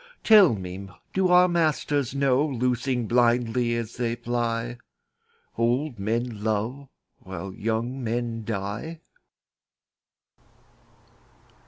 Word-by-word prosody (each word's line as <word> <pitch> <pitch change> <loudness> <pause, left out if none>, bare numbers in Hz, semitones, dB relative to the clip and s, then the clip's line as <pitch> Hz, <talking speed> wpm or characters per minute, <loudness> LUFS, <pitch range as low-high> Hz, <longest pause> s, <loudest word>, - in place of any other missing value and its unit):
Tell 205 - +7
me, 95 0 -7 0.2
do 190 -1 +2
our 180 0 +6
masters 150 -6 0
know, 140 0 +3
Loosing 125 -2 -1
blindly 120 0 +2
as 115 -1 -5
they 120 -1 -1
fly, 120 0 -2 0.8
Old 120 +2 0
men 115 +1 -2
love 115 +6 -2 0.3
while 95 0 -7
young 115 +5 -2
men 115 0 -2
die? 110 +10 -4
120 Hz, 95 wpm, -25 LUFS, 115-135 Hz, 0.8 s, Tell